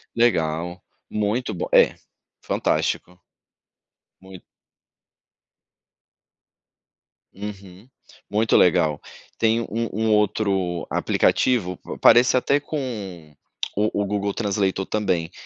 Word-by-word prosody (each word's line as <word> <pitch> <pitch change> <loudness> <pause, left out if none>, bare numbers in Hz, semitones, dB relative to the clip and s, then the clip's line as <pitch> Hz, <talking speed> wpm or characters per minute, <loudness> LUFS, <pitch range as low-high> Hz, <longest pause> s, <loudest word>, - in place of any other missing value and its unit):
Legal. 85 -6 0 0.3
Muito 105 +4 -1
bom 90 - -4
é, - - +5 0.5
fantástico. 90 0 -1 1.0
Muito. 95 -1 -12 2.9
Uhum, 100 +1 -9 0.4
muito 110 +2 +2
legal, 80 -4 +3 0.4
tem 115 +1 +2
um 115 +1 -3
um 110 +2 0
outro 100 -4 0
aplicativo 90 -8 +1
pa - - -9
parece 120 +1 +6
até 140 +3 +2
com 105 - -6 0.4
o 105 0 +1
o - - 0
Google 100 0 -2
translator 100 -3 -1
também, 90 -7 -1
100 Hz, 90 wpm, -23 LUFS, 90-110 Hz, 2.9 s, parece